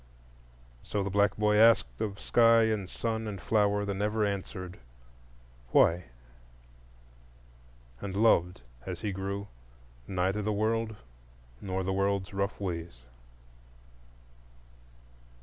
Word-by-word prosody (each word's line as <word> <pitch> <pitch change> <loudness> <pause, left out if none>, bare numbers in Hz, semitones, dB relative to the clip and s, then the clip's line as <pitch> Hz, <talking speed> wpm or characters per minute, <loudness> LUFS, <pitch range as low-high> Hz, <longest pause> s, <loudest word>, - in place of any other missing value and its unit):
So 100 +8 -2
the 100 - -3
black 100 +1 +2
boy 105 0 +3
asked 110 - +4
of 100 -2 -3
sky 115 -1 +5
and 105 -4 -1
sun 110 -1 -3
and 100 -2 -5
flower 105 0 +1
the 100 - -2
never 105 +2 0
answered 95 -2 -5 0.9
Why? 85 +6 +4 2.0
and 95 -1 -5
loved, 90 - +3 0.2
as - - -6
he 105 -2 -2
grew, 100 +1 -4 0.6
neither 95 +2 0
the 105 +1 -1
world 110 +1 0 0.7
nor 95 -1 -2
the 95 +1 -1
world's 100 -1 0
rough 100 0 -2
ways. 85 -9 -5
100 Hz, 110 wpm, -29 LUFS, 95-105 Hz, 2.0 s, sky